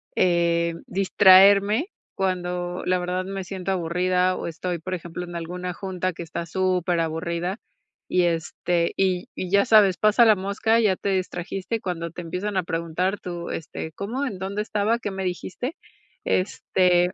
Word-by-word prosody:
eh, 170 -2 +2
distraerme, 200 - +5 0.3
cuando 180 -1 -2
la 180 0 +2
verdad, 180 +1 -2
me 195 0 -5
siento 190 0 -4
aburrida. 180 +1 +1
O - - -5
estoy, 170 +1 -4
por 185 +3 -5
ejemplo, 175 0 -5
en 175 -1 -8
alguna 180 +2 -5
junta, 185 0 -3
que 170 - -7
está 170 +1 -5
superaburrida. 175 0 -1 0.5
Y, 180 - +3
este, 170 +1 0
y 185 -2 0
y 185 - -5
ya 200 +1 +4
sabes, 210 -6 +5
pasa 215 +5 +5
la 220 -2 +6
mosca, 200 +4 +1
ya 205 -4 +3
te 200 - -2
distrajiste, 190 +3 -2
cuando 170 -3 -4
te 175 - -7
empiezan 185 +4 -3
a 185 - +1
preguntar, 170 +4 -2
tú: 175 -1 -6
"Este, 160 0 -5
¿cómo? 240 - -3
¿En 200 -9 -5
dónde 195 +2 -3
estaba? 215 +2 0
¿Qué 210 - -3
me 190 0 -4
dijiste?". 185 - -4 0.5
Este, 180 -1 +2
185 Hz, 160 wpm, -24 LUFS, 175-195 Hz, 0.5 s, la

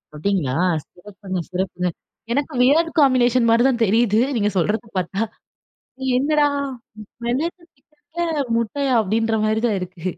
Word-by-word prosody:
அப்பிடிங்களா! 150 -5 -1 0.3
சிறப்புங்க, 190 0 -7
சிறப்புங்க. 180 -1 -2 0.4
எனக்கு 285 +4 -1
வியர்ட் 320 +6 +4
காம்பினேஷன் 255 -3 +4
மாரி 230 +1 +4
தான் 240 -3 -1
தெரியுது. 220 +1 +3 0.2
நீங்க 210 -1 +1
சொல்றத 210 +6 0
பார்த்தா. 185 +3 -2 1.0
என்னடா! 295 +2 +3 0.8
மிளகு 320 +9 -2
சிக்கன்ல 310 +2 -4
முட்டையா! 260 +4 -1
அப்பிடின்றமாரி 220 +1 0
தான் 210 -4 0
இருக்கு. 180 -2 -8
230 Hz, 110 wpm, -21 LUFS, 195-275 Hz, 1.0 s, வியர்ட்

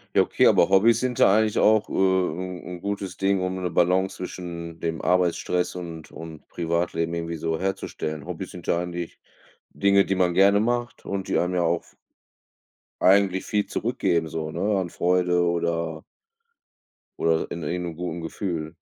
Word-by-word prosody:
Ja, - - +7
okay, - - +2
aber - - +5
Hobbys 115 +4 +5
sind 125 -1 -2
da 95 - +6
eigentlich 110 -1 +2
auch, 110 -1 +4
äh, - - -10
'n 95 -1 0
'n 90 -1 -8
gutes 100 -2 -4
Ding, 95 0 +1
um 95 0 -2
'ne 90 -1 -2
Balance 90 +3 +2
zwischen 85 -2 -7
dem 80 -1 -3
Arbeitsstress 90 0 +1
und 85 -3 -8
und 80 -2 -10
Privatleben 85 0 -1
irgendwie 85 0 -4
so 80 0 -2
herzustellen. 80 -6 -4
Hobbys - - -6
sind - - -11
ja - - +2
eigentlich 85 -1 -5 0.5
Dinge, 100 0 +3
die - - 0
man 90 -2 +1
gerne 100 +1 +5
macht 120 +2 -1
und 95 -1 -4
die - - +2
einem 90 +1 0
ja 90 - +2
auch 85 0 0
v - - -24 1.1
eigentlich 95 0 +4
viel 105 -1 0
zurückgeben 85 -1 0
so, 80 0 -4
ne? 100 +4 0
An 90 -2 -3
Freude 90 0 +1
oder 85 -2 -1 1.2
oder 80 -1 +1
in 85 - -5
irgend 90 +3 -2
'nem 80 - -9
guten 85 0 -4
Gefühl. 80 -2 -4
90 Hz, 170 wpm, -25 LUFS, 85-95 Hz, 1.2 s, Ja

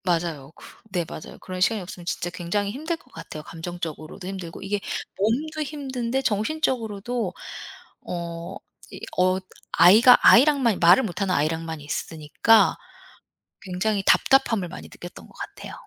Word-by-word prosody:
맞아요. 165 -6 -1
그 - - -16 0.3
네 175 -3 0
맞아요. - - -9
그런 185 0 -7
시간이 220 +3 +3
없으면 175 -1 -9
진짜 175 0 -2
굉장히 180 +4 -2
힘들 315 +8 -3
것 - - -25
같아요 165 -2 -8
감정적으로도 165 0 -7
힘들고 185 -3 -7
이게 200 +1 -2 0.4
몸도 290 +10 0
힘든데 265 -4 -3
정신적으로도 225 - -1 0.7
어 170 -1 -5 0.4
이 - - -8 0.2
어 185 +1 +3 0.3
아이가 230 +8 +8
아이랑만, 260 -5 +5
말을 175 +9 +7
못 190 -1 -4
하는 190 -2 +1
아이랑만 160 +2 -1
있으니까 155 +8 +2 0.9
굉장히 195 +2 -1
답답함을 230 -8 +3
많이 175 - -9
느꼈던 175 +1 -11
것 - - -19
같아요. - - -8
190 Hz, 335 characters per minute, -24 LUFS, 170-235 Hz, 0.9 s, 아이가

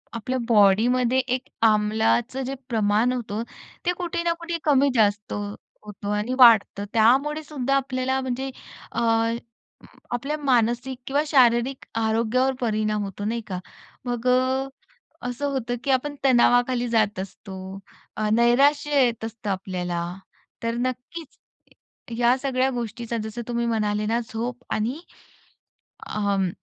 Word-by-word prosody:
आपल्या 255 +3 -2
बॉडीमध्ये 235 +4 +4
एक 255 0 -1 0.2
आम्लाचं 220 +4 +1
जे 270 - -3
प्रमाण 220 +1 +2
होतं 230 -3 -3 0.4
ते 355 - +3
कुठे 345 -1 -2
ना 335 - +2
कुठे 335 0 -3
कमी 280 -2 +4
जास्त 205 -2 +2 0.5
होतं 205 -1 -6
आणि 215 +5 -2
वाढत. 230 -4 +9
तर 200 - -3
त्यामुळेसुद्धा 275 +4 +2
आपल्याला 265 -1 0
म्हणजे 260 +1 -3 0.4
अ, - - -2 1.1
आपल्या 275 +5 -2
मानसिक 250 -2 +1
किंवा 285 +2 +1
शारीरिक 255 -1 +3
आरोग्यावर 230 +4 +1
परिणाम 215 -2 0
होतो. 200 0 -6
नाही 230 +2 -1
का? 185 -2 -4 0.5
मग 245 0 -2
अ, 260 +1 +2 0.6
असं 255 +4 -2
होतं 245 -3 -2
की 275 - +1
आपण 285 +3 0
तणावाखाली 245 -1 +3
जात 215 -4 +1
असतो. 190 0 -8 0.5
नैराश्य 280 +5 +4
येत 230 -2 -2
असतं 225 -2 -6
आपल्याला. 180 -2 -3 0.6
तर 230 0 -1
नक्कीच 255 +5 -5 0.8
या 240 +1 +4
सगळ्या 265 -1 0
गोष्टीचा 235 -1 -4
जसं 220 +2 -5
तुम्ही 235 -1 -1
म्हणाले 210 -2 0
ना 230 +2 +1
झोप 245 +2 -4
आणि 235 +8 -1 1.1
अं, 200 -3 0
240 Hz, 125 wpm, -24 LUFS, 215-260 Hz, 1.1 s, वाढत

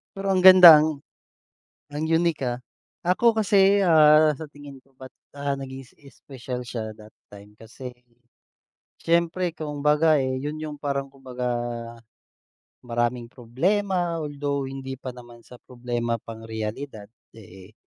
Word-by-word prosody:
Pero 195 0 -5
ang 185 - +1
ganda, 180 -4 +10
ang 155 -2 -3 0.9
ang 150 +2 -4
unique 165 -2 0
ah. 125 -1 -3 0.4
Ako 185 +7 +3
kasi, 200 -2 +3
ah, 155 -3 +5
sa 160 +3 -8
tingin 145 -1 -12
ko 135 - -31
ba't, 130 0 -11 0.2
ah, 140 0 -3
naging 135 0 -8
s - - -25 0.2
special 125 -2 -7
siya 110 -3 -5
that 110 0 -15 0.2
time, 105 +1 -15
kasi, 125 +3 -11 1.1
siyempre 170 +1 0
kumbaga, 150 +1 +1
eh, 130 0 -2
'yon 150 +3 -5
yung 150 -1 -7
parang 140 -1 -3
kumbaga, 130 -2 -6 1.4
maraming 120 0 -2
problema, 175 - -2
although 145 -1 -3
hindi 135 0 -7
pa 130 0 -8
naman 120 -1 -15
sa 125 - -15
problema 120 -2 -4
pang 115 0 -11
realidad, 110 0 -6 0.3
eh, 95 -1 -15
140 Hz, 135 wpm, -24 LUFS, 120-160 Hz, 1.4 s, ganda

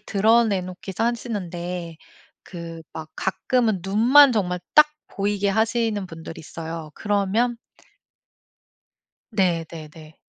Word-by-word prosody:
드러내 210 0 +3
놓기도 185 +3 -6
하시는데 180 -8 -3 0.5
그 165 -2 -8
막 155 -1 -7
가끔은 220 +1 0
눈만 245 +9 +6
정말 180 -5 -1 0.2
딱 300 0 +9 0.2
보이게 200 0 -1
하시는 220 -1 0
분들이 165 -1 -9
있어요. 160 0 -7
그러면 210 +4 0 1.7
네 175 -5 +1
네네. 155 -1 -11
195 Hz, 220 characters per minute, -23 LUFS, 170-220 Hz, 1.7 s, 딱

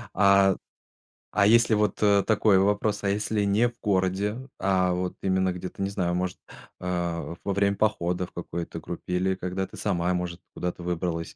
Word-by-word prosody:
А 100 0 +5 0.8
а 100 - +3
если 115 +2 +5
вот 105 0 +1
э 100 -2 +4
такой 105 -2 +3
вопрос? 105 +2 +1
А 100 - +1
если 105 +1 0
не 100 +4 +3
в 120 - -7
городе, 100 +1 0 0.2
а 95 -2 +2
вот 90 0 -2
именно 95 -1 +1
где-то, 90 +2 -7
не 95 - 0
знаю, 90 -3 -1
может, 90 0 -2 0.4
а, 85 -2 -3
во 100 - -1
время 100 0 +2
похода 90 -4 0
в - - -17
какой-то 85 -1 -5
группе, 90 - -6
или 95 +1 +1
когда 95 +1 -3
ты - - -13
сама 90 -3 0
может 90 -1 -3
куда-то 90 0 -4
выбралась 85 -1 -3
95 Hz, 175 wpm, -26 LUFS, 90-100 Hz, 0.8 s, А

